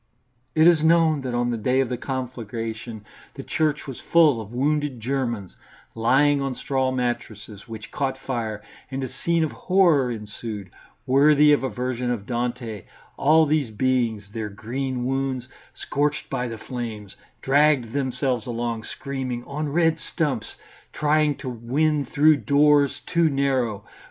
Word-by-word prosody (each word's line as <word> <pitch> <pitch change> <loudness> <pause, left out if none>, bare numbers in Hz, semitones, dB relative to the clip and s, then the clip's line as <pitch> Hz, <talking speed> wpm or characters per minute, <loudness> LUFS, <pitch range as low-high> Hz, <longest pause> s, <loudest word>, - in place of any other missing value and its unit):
It 160 0 +5
is 170 -3 +6
known 160 -2 +4
that 125 -2 -3
on 120 0 +1
the 120 - -1
day 125 +5 +1
of 135 - +2
the 125 - -1
conflagration 115 -3 -5 0.3
the - - -7
church 150 -2 0
was 135 -3 -7
full 155 -8 +4
of 110 0 -10
wounded 145 +1 0
Germans 120 -5 -3 0.4
lying 140 +5 +3
on 135 -2 -2
straw 130 0 0
mattresses, 120 -5 -4
which 110 -2 -9
caught 135 -2 -2
fire, 115 -5 -4 0.3
and 135 0 -4
a 130 - -5
scene 170 -1 0
of 155 - -1
horror 170 -9 +3
ensued, 105 -3 -6 0.3
worthy 150 +2 +5
of 145 - +2
a 130 - 0
vision 125 -1 -3
of 115 -5 -2
Dante; 120 -4 -3 0.3
all 160 +3 +4
these 150 -4 +1
beings, 115 -2 0
their 110 -2 -3
green 125 +4 -4
wounds 135 -1 -2 0.3
scorched 150 +2 -2
by 125 -2 -1
the 115 -1 -6
flames, 110 -5 -6 0.3
dragged 140 -4 +3
themselves 130 -3 -1
along 115 -1 -3
screaming, 130 -3 -5
on 150 +1 -3
red 165 +1 +2
stumps, 140 -11 -3 0.4
trying 150 0 +2
to 135 - -9
win 140 +5 0
through 150 +1 +4
doors 145 0 +3
too 170 -1 +2
narrow. 130 -7 0
130 Hz, 150 wpm, -24 LUFS, 115-145 Hz, 0.4 s, is